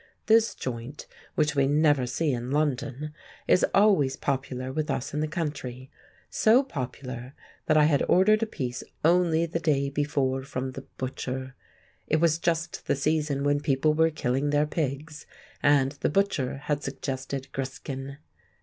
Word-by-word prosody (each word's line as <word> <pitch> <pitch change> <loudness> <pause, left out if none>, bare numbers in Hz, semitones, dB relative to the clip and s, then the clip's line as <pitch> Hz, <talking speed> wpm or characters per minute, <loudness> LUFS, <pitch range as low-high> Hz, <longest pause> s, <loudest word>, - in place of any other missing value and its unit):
This 225 +1 +4
joint—which 140 +4 -4
we 135 -1 +3
never 145 -3 +3
see 150 +3 0
in 120 0 -3
London—is 150 +4 -1
always 190 -10 +4
popular 130 -2 -3
with 155 +1 -2
us 140 +3 -2
in 150 - -1
the 155 - 0
country; 145 -5 -5 0.4
so 235 +5 +4
popular, 130 - -6 0.3
that 155 - +4
I 150 - +6
had 150 -2 +3
ordered 215 +4 +5
a 225 - +1
piece 125 - -4 0.2
only 170 -1 +4
the 165 0 -3
day 140 -4 +1
before 140 -2 0
from 130 -1 -4
the 135 +1 -9
butcher. 130 0 -4 0.5
It 155 - +2
was 165 -1 +3
just 170 0 -2
the - - +2
season 145 -1 0
when 145 0 +2
people 145 +1 +2
were 160 +1 +4
killing 140 -2 -1
their 145 +1 +3
pigs, 150 0 -4 0.3
and 140 -2 +4
the 140 - -2
butcher 155 -7 0
had 145 -1 0
suggested 135 0 -4
griskin. 135 +1 -5
145 Hz, 150 wpm, -27 LUFS, 130-155 Hz, 0.5 s, I